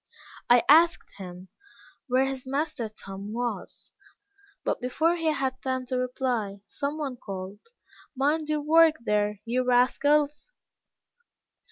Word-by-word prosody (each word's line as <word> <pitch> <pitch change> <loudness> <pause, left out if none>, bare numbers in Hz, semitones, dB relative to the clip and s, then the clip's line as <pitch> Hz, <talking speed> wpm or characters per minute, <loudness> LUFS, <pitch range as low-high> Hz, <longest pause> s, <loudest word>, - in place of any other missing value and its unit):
I 240 -1 +6
asked 330 -4 +4
him 180 0 -9 0.6
where 260 +1 +3
his 270 -1 -4
master 270 -3 -2
Tom 200 -1 -9
was; 240 +1 -5 0.7
but - - -1
before 315 +7 +1
he 330 -2 -2
had 265 -4 -1
time 260 -1 -2
to 255 - -3
reply, 250 -5 -2
same 285 +2 -4
one 275 -5 -4
called 195 -1 -7 0.6
"Mind 300 +3 0
your 305 -1 0
work 320 +1 +5
there, 210 -1 0
you 250 +2 0
rascals." 290 - +2
255 Hz, 125 wpm, -27 LUFS, 225-295 Hz, 0.7 s, I